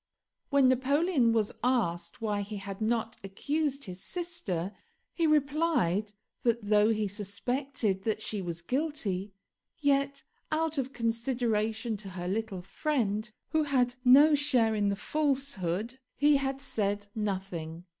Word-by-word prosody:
When 280 Hz, -3 st, +5 dB
Napoleon 265 Hz, +1 st, +3 dB
was 220 Hz, -2 st, +1 dB
asked 225 Hz, -4 st, 0 dB
why 210 Hz, -2 st, 0 dB
he 205 Hz, +1 st, -5 dB
had 200 Hz, +1 st, -7 dB
not 225 Hz, +1 st, 0 dB
accused 280 Hz, +8 st, -1 dB
his 185 Hz, -1 st, -7 dB
sister, 215 Hz, -, -3 dB, 0.4 s
he 335 Hz, -2 st, +1 dB
replied 280 Hz, -, +2 dB, 0.3 s
that 235 Hz, -2 st, +1 dB
though 210 Hz, +1 st, +4 dB
he 215 Hz, -2 st, +1 dB
suspected 210 Hz, +2 st, -2 dB
that 215 Hz, 0 st, -1 dB
she 215 Hz, -2 st, -3 dB
was 170 Hz, -2 st, -5 dB
guilty, 220 Hz, -, -2 dB, 0.5 s
yet 280 Hz, -1 st, +1 dB, 0.3 s
out 315 Hz, -1 st, 0 dB
of 265 Hz, 0 st, -2 dB
consideration 230 Hz, -2 st, -1 dB
to 195 Hz, -1 st, -8 dB
her 180 Hz, -1 st, -5 dB
little 200 Hz, -2 st, -2 dB
friend, 215 Hz, -, -1 dB, 0.2 s
who 315 Hz, -, +2 dB
had 260 Hz, -4 st, +2 dB
no 280 Hz, +5 st, +8 dB
share 255 Hz, -6 st, +3 dB
in 205 Hz, -1 st, +1 dB
the 200 Hz, -, 0 dB
falsehood, 260 Hz, -, -1 dB, 0.2 s
he 290 Hz, +1 st, +5 dB
had 270 Hz, 0 st, -2 dB
said 205 Hz, -6 st, -1 dB
nothing. 185 Hz, -5 st, -4 dB
225 Hz, 135 wpm, -30 LUFS, 200-275 Hz, 0.5 s, no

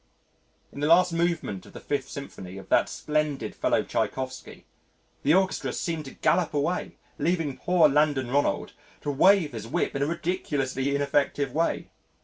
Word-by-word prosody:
In -, -, -9 dB
the 145 Hz, -, +1 dB
last 175 Hz, +2 st, +5 dB
movement 165 Hz, -, -1 dB
of -, -, -15 dB
the -, -, -8 dB
Fifth 140 Hz, -2 st, -3 dB
Symphony 95 Hz, -9 st, -8 dB
of 95 Hz, -1 st, -11 dB
that -, -, +3 dB
splendid 150 Hz, -2 st, -2 dB
fellow -, -, +1 dB
Tschaikovsky, 130 Hz, -1 st, -4 dB, 0.6 s
the 150 Hz, +4 st, +4 dB
orchestra 190 Hz, 0 st, +1 dB
seemed 165 Hz, -3 st, -3 dB
to 135 Hz, -, -10 dB
gallop 170 Hz, -4 st, +1 dB
away 165 Hz, +5 st, -1 dB, 0.2 s
leaving 165 Hz, -5 st, 0 dB
poor 180 Hz, -3 st, +4 dB
Landon 145 Hz, -3 st, +2 dB
Ronald 140 Hz, -7 st, 0 dB, 0.3 s
to 145 Hz, -, -2 dB
wave 180 Hz, +2 st, +4 dB
his 115 Hz, -2 st, -6 dB
whip -, -, -1 dB
in 140 Hz, -, -1 dB
a 140 Hz, -, +2 dB
ridiculously 140 Hz, -5 st, -1 dB
ineffective 140 Hz, -1 st, 0 dB
way. 165 Hz, +3 st, -1 dB
145 Hz, 155 wpm, -26 LUFS, 135-165 Hz, 0.6 s, last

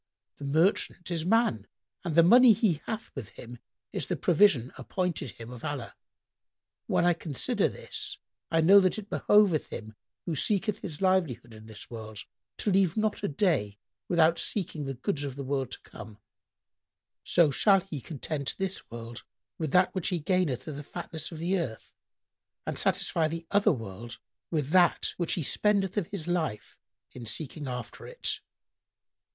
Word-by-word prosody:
The 145 Hz, -, -7 dB
merchant 170 Hz, +3 st, +1 dB
is 165 Hz, -1 st, -1 dB
man 185 Hz, -, +2 dB, 0.4 s
and 170 Hz, -4 st, -2 dB
the 170 Hz, -, +7 dB
money 240 Hz, +6 st, +8 dB
he 185 Hz, -8 st, +1 dB
hath 220 Hz, -1 st, -4 dB
with 120 Hz, -7 st, -6 dB
him 120 Hz, 0 st, -10 dB, 0.3 s
is -, -, -2 dB
the -, -, -1 dB
provision 155 Hz, -, +3 dB
appointed 165 Hz, +1 st, -3 dB
him 115 Hz, +3 st, -10 dB
of 125 Hz, -2 st, -10 dB
Allah. 145 Hz, -6 st, -4 dB, 0.9 s
When -, -, +2 dB
I 175 Hz, -, +5 dB
consider 160 Hz, -5 st, +1 dB
this, -, -, -6 dB, 0.3 s
I 165 Hz, 0 st, +3 dB
know 195 Hz, +5 st, +8 dB
that 185 Hz, +2 st, +2 dB
it 210 Hz, -1 st, -8 dB
behoveth 205 Hz, -7 st, +4 dB
him 110 Hz, 0 st, -7 dB, 0.3 s
who 165 Hz, -, -2 dB
seeketh 210 Hz, -, 0 dB
his 160 Hz, -4 st, -7 dB
livelihood 155 Hz, -12 st, +1 dB
in 110 Hz, 0 st, -13 dB
this 110 Hz, +1 st, -11 dB
world 110 Hz, -3 st, -7 dB, 0.3 s
to 210 Hz, -, 0 dB
leave 190 Hz, -1 st, +3 dB
not 215 Hz, -1 st, 0 dB
a 205 Hz, -, 0 dB
day 140 Hz, -, 0 dB, 0.3 s
without 170 Hz, -1 st, +4 dB
seeking 170 Hz, -7 st, -2 dB
the 135 Hz, -, -3 dB
goods 145 Hz, +3 st, -2 dB
of 140 Hz, -3 st, -4 dB
the 140 Hz, -, -5 dB
world 135 Hz, -1 st, -1 dB
to -, -, -8 dB
come, 110 Hz, -2 st, -11 dB, 1.1 s
so 170 Hz, -4 st, +4 dB
shall 195 Hz, +6 st, +4 dB
he 170 Hz, -7 st, -7 dB
content 145 Hz, 0 st, -4 dB
this 195 Hz, 0 st, -4 dB
world 115 Hz, 0 st, -8 dB, 0.4 s
with 155 Hz, -4 st, -2 dB
that 180 Hz, +3 st, +4 dB
which 185 Hz, -3 st, -1 dB
he 180 Hz, -, +1 dB
gaineth 165 Hz, -5 st, 0 dB
of 150 Hz, -3 st, -5 dB
the 145 Hz, -, -6 dB
fatness 165 Hz, +1 st, -6 dB
of 165 Hz, -, -7 dB
the 180 Hz, +4 st, 0 dB
earth 115 Hz, -10 st, -5 dB, 0.7 s
and -, -, -3 dB
satisfy 160 Hz, -2 st, +1 dB
the 165 Hz, +1 st, -5 dB
other 205 Hz, 0 st, +4 dB
world 115 Hz, -1 st, -6 dB, 0.3 s
with 150 Hz, -4 st, -1 dB
that 180 Hz, -1 st, +4 dB
which 175 Hz, -2 st, 0 dB
he 170 Hz, -, -1 dB
spendeth 200 Hz, +4 st, +1 dB
of 205 Hz, -6 st, 0 dB
his 185 Hz, -5 st, -5 dB
life 160 Hz, -11 st, -2 dB, 0.4 s
in 120 Hz, -2 st, -9 dB
seeking 145 Hz, +5 st, -2 dB
after 125 Hz, -1 st, -6 dB
it." -, -, -2 dB
160 Hz, 170 wpm, -29 LUFS, 130-185 Hz, 1.1 s, money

